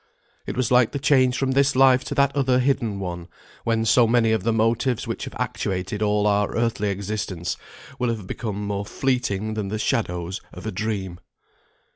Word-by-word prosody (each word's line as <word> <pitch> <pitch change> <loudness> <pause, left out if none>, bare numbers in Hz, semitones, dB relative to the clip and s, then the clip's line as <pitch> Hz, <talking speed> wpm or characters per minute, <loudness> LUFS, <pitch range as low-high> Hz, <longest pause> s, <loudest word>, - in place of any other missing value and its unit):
It - - -4
was 130 -2 0
like 125 -2 +4
the - - -1
change 130 -3 +3
from 135 -1 0
this 140 0 +3
Life 130 -1 +5
to - - -4
that 140 0 +2
other 130 -3 +2
hidden 125 -6 0
one, 90 -2 -5 0.4
when 115 -1 +1
so 115 +1 +5
many 115 -1 +3
of 110 -3 +1
the 115 - +1
motives 115 +2 +1
which - - -4
have - - -9
actuated 95 +2 -3
all 105 -1 +2
our 105 -1 +1
earthly 115 -3 0
existence, 100 -3 -3 0.4
will 125 - +1
have 110 -4 -3
become 105 0 -4
more 100 0 -2
fleeting 110 -3 -1
than 105 -2 -3
the 105 +2 -3
shadows 95 -5 -1
of 90 - -10
a 110 - -2
dream. 95 -3 -3
110 Hz, 185 wpm, -23 LUFS, 100-125 Hz, 0.4 s, Life